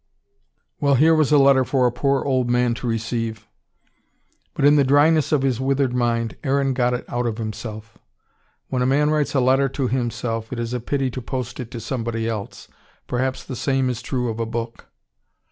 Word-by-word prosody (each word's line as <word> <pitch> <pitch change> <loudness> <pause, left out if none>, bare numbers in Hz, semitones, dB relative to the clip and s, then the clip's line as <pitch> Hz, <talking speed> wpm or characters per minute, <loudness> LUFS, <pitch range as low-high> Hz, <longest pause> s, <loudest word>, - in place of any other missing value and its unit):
Well, 140 -1 +3
here 155 +5 +5
was 155 -3 +2
a 150 - +6
letter 135 -1 +5
for 130 0 +1
a 120 - +3
poor 135 +2 0
old 130 -3 +1
man 125 0 +2
to 120 - -5
receive. 115 -1 -3 1.1
But, - - +1
in 145 +1 +6
the 145 - +5
dryness 145 +3 +3
of 145 -3 +2
his 130 -2 0
withered 135 -1 +1
mind, 115 -2 -1
Aaron 135 -1 +1
got 125 -1 +1
it 125 - -6
out 120 0 -2
of 110 -2 -3
himself. 110 0 -7 0.7
When 125 - -1
a 125 - +2
man 150 +3 +2
writes 150 -1 0
a - - +4
letter 135 +2 +3
to 135 0 -2
himself, 120 -2 -2
it 130 - -4
is 120 0 -3
a 125 - -1
pity 135 +2 -1
to 130 - -5
post 125 -1 -5
it 125 -3 -5
to 120 -2 -7
somebody 115 -1 -3
else. 110 -3 -5 0.4
Perhaps 130 +1 -2
the 130 - -7
same 135 0 0
is 120 -1 -5
true 125 0 -2
of 110 0 -5
a 115 - 0
book. 115 0 -5
125 Hz, 200 wpm, -22 LUFS, 115-135 Hz, 1.1 s, a